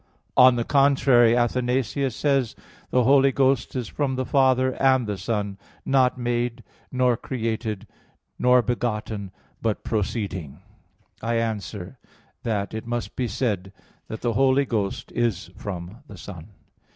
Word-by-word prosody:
On 125 0 +7
the 120 - 0
contrary, 135 -4 +4
Athanasius 125 +1 0
says: 135 -5 +1 0.3
"The 125 - +3
Holy 135 +2 +5
Ghost 135 -2 +1
is 125 -4 -2
from 135 +1 -2
the 130 0 -2
Father 130 -1 +3
and 130 -2 +4
the 105 -1 -2
Son; 100 0 -3 0.3
not 130 -2 +3
made, 120 -1 -2 0.3
nor 125 -2 +2
created, 110 -4 -3 0.5
nor 125 0 +5
begotten, 110 -4 -2 0.3
but 110 -2 -1
proceeding." 100 - -3 0.6
I 115 +1 -1
answer 110 -1 -3 0.4
that, 105 -6 -2
It 110 +1 -5
must 120 0 -3
be 125 - -1
said 100 -6 -2 0.4
that 110 - -7
the 120 -1 0
Holy 135 +3 +3
Ghost 105 -6 -2
is 115 -6 -1
from 95 +2 -7
the 100 - -11
Son. 85 -1 -9
120 Hz, 135 wpm, -24 LUFS, 105-130 Hz, 0.6 s, On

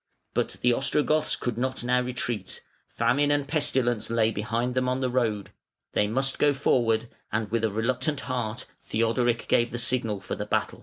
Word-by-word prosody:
But - - 0
the 125 0 +4
Ostrogoths 150 +4 +2
could 120 -2 -3
not 130 0 -1
now 125 +1 +2
retreat; 120 -5 -3 0.2
famine 125 +5 +1
and 145 -1 +1
pestilence 125 -7 +1
lay 115 -1 +2
behind 115 +4 -1
them 130 0 +1
on 130 +1 0
their 130 -1 -1
road; 110 -5 0 0.4
they 105 - +2
must 135 +5 -1
go 145 -1 +4
forward, 115 -4 +2 0.2
and 110 -1 -2
with 115 -1 0
a 110 - +3
reluctant 130 +7 -1
heart 120 -3 -3 0.2
Theodoric 115 +1 0
gave 120 0 +3
the 120 - -4
signal 120 -4 0
for 95 - -6
the - - -4
battle. - - -1
120 Hz, 175 wpm, -26 LUFS, 115-130 Hz, 0.4 s, the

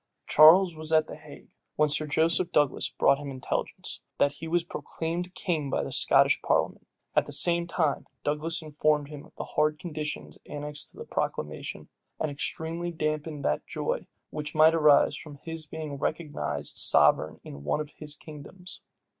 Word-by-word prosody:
Charles 170 +3 +7
was 155 0 -5
at 155 -1 +5
the - - -8
Hague, 150 -1 -14 0.2
when 150 - +3
Sir 150 +1 +1
Joseph 165 +4 +2
Douglas 145 -5 +2
brought 140 - +3
him 145 -1 -6
intelligence, 130 -1 -4 0.2
that 145 - +3
he 160 +3 -8
was 170 +1 +1
proclaimed 175 +1 -4
king 155 -6 -1
by - - 0
the - - -5
Scottish - - +4
parliament. - - 0 0.3
At - - +3
the - - -7
same 170 +4 +2
time, 160 -4 0 0.2
Douglas 160 +3 -1
informed 150 -1 +1
him 150 -2 -9
of - - -27
the - - -3
hard 150 0 +1
conditions 155 -2 -5
annexed 150 0 -6
to - - -19
the - - -7
proclamation, 75 +1 -4 0.3
and 155 - -1
extremely 160 +6 -3
damped 155 -1 -2 0.2
that 75 - -1
joy - - -3 0.2
which 150 0 -5
might 155 +1 +7
arise 150 -3 +5
from 145 0 -8
his 160 +2 -7
being 150 -3 -6
recognized 145 - -3
sovereign - - +4
in 70 0 -9
one 75 - 0
of 150 -1 -5
his 150 -1 -5
kingdoms. 160 +5 -10
155 Hz, 170 wpm, -28 LUFS, 145-165 Hz, 0.3 s, Charles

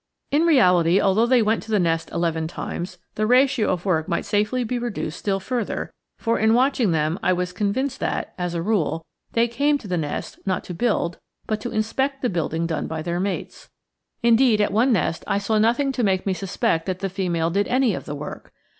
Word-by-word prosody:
In 310 +4 +3
reality, 180 - +5
although 215 +5 +3
they 250 -2 +4
went 220 +1 +1
to - - -13
the 215 - +2
nest 165 -3 0
eleven 165 -2 -1
times, 180 +2 -5 0.2
the 215 0 0
ratio 255 -1 +3
of 180 +1 -3
work 160 -5 +1
might 170 - -1
safely 210 +5 0
be 245 +1 -2
reduced 230 -9 -4
still 195 -1 0
further; 240 +3 -3 0.2
for 230 0 0
in 220 +1 +4
watching 255 -3 +2
them 160 +2 0
I - - +2
was 180 0 -2
convinced 245 +8 -1
that, - - -2
as 180 -1 -3
a 165 - -1
rule, 165 -5 0 0.3
they 230 +1 +3
came 285 +5 +1
to 235 - -11
the 180 -2 -1
nest, 145 -2 -4
not 190 -2 -1
to 180 - -7
build, 185 -3 0 0.3
but 215 -1 -2
to - - -4
inspect 265 +6 -1
the 250 - +2
building 165 -1 -1
done 165 -2 -2
by 160 -1 -4
their 175 +1 -2
mates. 195 +1 -4 0.5
Indeed, 235 -1 +5
at 205 - +1
one 240 +5 +3
nest, 170 -6 0
I - - +1
saw 215 +2 +1
nothing 240 +6 +2
to 250 -2 -2
make 190 -2 +1
me 195 - +1
suspect 180 -3 -1
that 185 -1 -1
the 195 - -2
female 175 -3 -1
did 200 +3 +1
any 255 -3 +2
of - - -5
the 145 - -5
work. 150 +1 -8
200 Hz, 215 wpm, -23 LUFS, 175-235 Hz, 0.5 s, reality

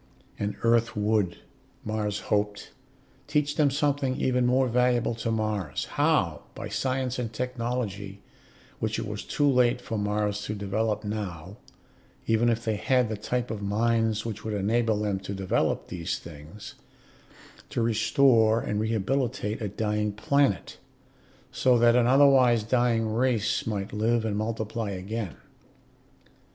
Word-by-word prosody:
And 105 0 -2
Earth 115 -1 +2
would, 105 -4 +1 0.5
Mars 105 -1 -2
hoped, 105 0 -1 0.6
teach 145 0 0
them 150 -2 +3
something 140 -1 0
even 125 -1 +2
more 130 +1 +3
valuable 125 0 +2
to 115 0 -4
Mars: 110 -8 -2
how, - - +1
by - - -6
science 130 -1 -1
and 115 -3 -3
technology 115 -5 -3 0.6
which - - -1
it - - -3
was - - -5
too 145 - 0
late 125 -2 +3
for 115 -3 -4
Mars 105 0 -1
to 105 - -3
develop 105 +2 -1
now, 100 -4 -5 0.7
even 115 +1 +3
if 115 0 -1
they 110 -2 0
had 125 +1 +2
the 110 - -2
type 120 +4 -2
of 110 -2 -4
minds 110 +1 +1
which 110 -2 -5
would 110 -1 -3
enable 110 +2 +1
them 105 -2 -1
to 100 +1 -6
develop 95 -1 -1
these 85 -2 -3
things 80 +5 -11 1.0
to 120 - -1
restore 115 0 +4
and 105 -2 -2
rehabilitate 110 0 -1
a 105 - -1
dying 105 +1 -1
planet, 135 0 0 0.7
so 125 -1 +3
that 120 0 +5
an 120 -1 +4
otherwise 130 -4 +5
dying 115 -1 +1
race 115 -3 +1
might 100 -3 -3
live 115 +2 +1
and 105 -2 -1
multiply 110 0 -3
again. 100 +1 -4
110 Hz, 140 wpm, -27 LUFS, 105-125 Hz, 1.0 s, that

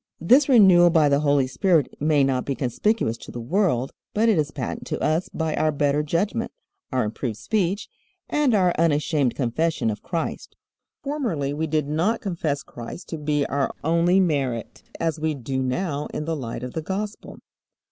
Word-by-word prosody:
This 260 - +4
renewal 190 -8 +7
by 160 -3 +4
the 140 0 +3
Holy 145 -2 +3
Spirit 155 +2 +2
may 150 -1 +3
not 130 -2 +1
be 140 - -2
conspicuous 130 - 0
to - - -12
the 120 - -6
world, 135 - 0 0.2
but 225 +2 +3
it 205 -7 +3
is 150 -1 0
patent 135 -4 -5
to - - -3
us 160 +4 0
by 160 -1 -2
our 155 - +2
better 145 0 +1
judgment, 195 +10 -1 0.4
our 130 - +1
improved 110 +1 -3
speech, 200 - -1 0.4
and 290 -6 +2
our 180 -3 +3
unashamed 150 -5 +1
confession 130 0 0
of 105 - -7
Christ. 170 -2 -4 0.5
Formerly 225 - -2
we 160 +2 -2
did 155 -1 0
not 165 +10 0
confess 165 -7 -2
Christ 120 +9 -9
to 160 - -5
be 145 -1 0
our 140 0 -1
only 170 +4 +3
merit, 135 - -1 0.2
as 165 -1 -1
we 155 -1 -1
do 130 0 -3
now 145 +3 -2
in 150 - -3
the 165 0 -1
light 120 -4 -5
of 125 - -6
the 160 - -3
Gospel. 200 +5 -5
155 Hz, 180 wpm, -24 LUFS, 140-180 Hz, 0.5 s, renewal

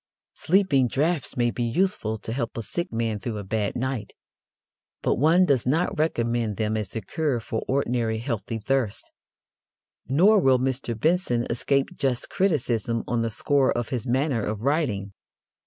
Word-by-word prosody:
Sleeping 160 -8 +2
draughts 150 +3 -1
may 120 -1 +2
be 120 - -5
useful 120 - 0
to 110 - -5
help 120 -3 -3
a 115 - -3
sick 175 - -3
man 115 -2 -1
through 110 0 -4
a 105 - -5
bad 105 +1 -2
night, 130 -2 -3 0.9
but - - +1
one 165 +6 +5
does 135 -7 +1
not 160 +7 +1
recommend 115 -8 0
them 110 0 0
as 105 -2 -4
a 115 - -2
cure 140 +4 -1
for 110 0 -4
ordinary 120 -4 0
healthy 115 -1 -3
thirst. 115 -1 -1 1.0
Nor 190 +11 +5
will 135 -7 +4
Mr. 125 -3 -2
Benson 155 -7 +1
escape 140 +7 0
just 130 -6 -1
criticism 120 - 0
on 120 0 0
the 115 - 0
score 135 +4 +2
of 120 -2 -2
his 125 -1 -3
manner 130 -2 +1
of 105 0 -3
writing. 120 -9 0
120 Hz, 160 wpm, -25 LUFS, 115-145 Hz, 1.0 s, one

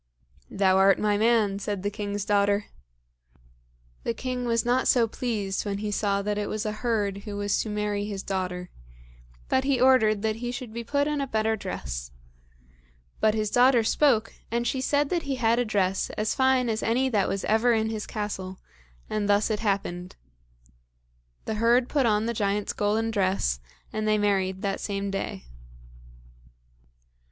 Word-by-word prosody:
"Thou 190 -1 +3
art 195 0 +5
my 210 -1 +1
man," 215 -2 +2
said 200 -1 -3
the 205 - -1
king's 205 -1 -4
daughter. 205 0 +2 1.4
The 235 - -2
king 250 +1 -3
was 230 -1 +1
not 250 +2 +2
so 235 -3 +4
pleased 210 -5 -2
when 200 -1 -3
he 210 +1 -3
saw 200 -1 0
that 210 0 -1
it 205 - -2
was 215 +1 -3
a 215 - 0
herd 210 -3 -1
who 205 0 -7
was 205 0 0
to 220 - -4
marry 210 -1 -1
his 200 -2 -5
daughter, 180 -2 -3 0.8
but 260 - +2
he 270 -2 +1
ordered 225 -5 +4
that 220 0 0
he 240 +1 -4
should 245 -3 -7
be 235 0 -4
put 285 +4 0
in 300 -1 -1
a 275 - -2
better 220 -2 +1
dress; 60 - -5 1.1
but 215 0 +3
his 215 -1 -1
daughter 245 -1 +5
spoke, 230 -2 +2 0.2
and 235 +1 -1
she 260 +1 -1
said 285 +2 +1
that 350 -2 0
he 275 -3 -3
had 235 -1 +2
a 245 - +1
dress 195 -3 0
as 215 0 0
fine 260 -2 +3
as 220 -1 -1
any 250 +4 +1
that 210 -7 +1
ever 225 +3 +3
was 225 - +2
in 220 0 -1
his 215 -1 -4
castle; 190 -3 -4 0.5
and 205 -1 -2
thus 205 +2 +3
it 210 - -1
happened. 195 -4 -2 1.3
The - - -2
herd 240 +2 +4
put 275 -4 +1
on 210 0 +2
the 235 - -1
giant's 205 -1 -1
golden 220 +2 0
dress, 185 - 0 0.3
and 215 0 -2
they 215 0 +3
married 190 -2 0
that 195 -1 -1
same 200 -1 -3
day. 195 - -4
215 Hz, 175 wpm, -26 LUFS, 200-235 Hz, 1.4 s, art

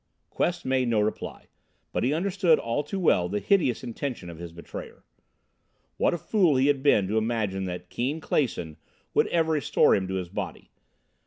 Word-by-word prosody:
Quest 175 0 -1
made 130 -1 +1
no 115 -2 +2
reply, 105 +1 -3 0.5
but - - -1
he 125 - +2
understood 180 0 +3
all 115 +5 -1
too 190 +7 -4
well 90 - +3
the 105 - -1
hideous 130 - +2
intention 120 -6 -5
of 80 - -11
his 85 -1 -7
betrayer. 85 +1 -9 0.9
What - - +2
a - - -3
fool 175 -3 +2
he 130 +1 +3
had 140 -2 +2
been 105 -9 +4
to 110 +3 +1
imagine 110 -4 -1
that 90 -1 -6
Keane 135 +6 -1
Clason 100 - -1 0.4
would - - +3
ever 165 -1 +1
restore 150 -3 +3
him 95 -1 +1
to 95 - -3
his 90 -2 -3
body! - - -6
125 Hz, 180 wpm, -26 LUFS, 95-155 Hz, 0.9 s, been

